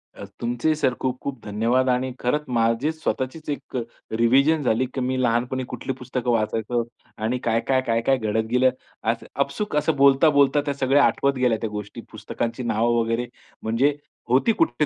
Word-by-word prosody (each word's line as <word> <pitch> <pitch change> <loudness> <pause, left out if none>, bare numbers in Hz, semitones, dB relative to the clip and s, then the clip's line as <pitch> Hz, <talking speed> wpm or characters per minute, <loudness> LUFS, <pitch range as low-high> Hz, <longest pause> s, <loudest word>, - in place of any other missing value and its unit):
अ, - - -8 0.2
तुमचेही 120 +6 0
सर 130 -4 +1
खूप, 130 -1 -2
खूप 140 -3 -5
धन्यवाद 115 +5 +1
आणि 125 +1 0
खरंच 150 +5 0
माझी 115 +4 +1
स्वतःचीच 155 0 -4
एक 145 - -5 0.4
रिव्हिजन 135 +7 +3
झाली, 125 0 +2
की 130 - -2
मी 130 +1 0
लहानपणी 125 +2 0
कुठली 135 - -3
पुस्तकं 125 -1 -3
वाचायचो 115 +1 0 0.3
आणि 115 +4 -1
काय, 115 -2 0
काय, 130 -1 +3
काय, 115 0 +2
काय 135 +3 +2
घडत 110 -1 -1
गेलं. 125 +1 +4 0.3
असं 115 +1 -1 0.2
अपसूक 145 +8 -2
असं 150 +1 +1
बोलता 140 +2 +5
बोलता 145 0 +4
त्या 145 - -1
सगळ्या 140 +1 +3
आठवत 140 0 +2
गेल्या 125 -3 +2
त्या 110 - -2
गोष्टी 105 +2 -7
पुस्तकांची 115 +2 -4
नावं 120 +1 +1
वगैरे 115 +1 -1 0.4
म्हणजे 125 +6 +2 0.3
होती 130 - +4
कुठे 150 - +1
125 Hz, 175 wpm, -23 LUFS, 115-140 Hz, 0.4 s, बोलता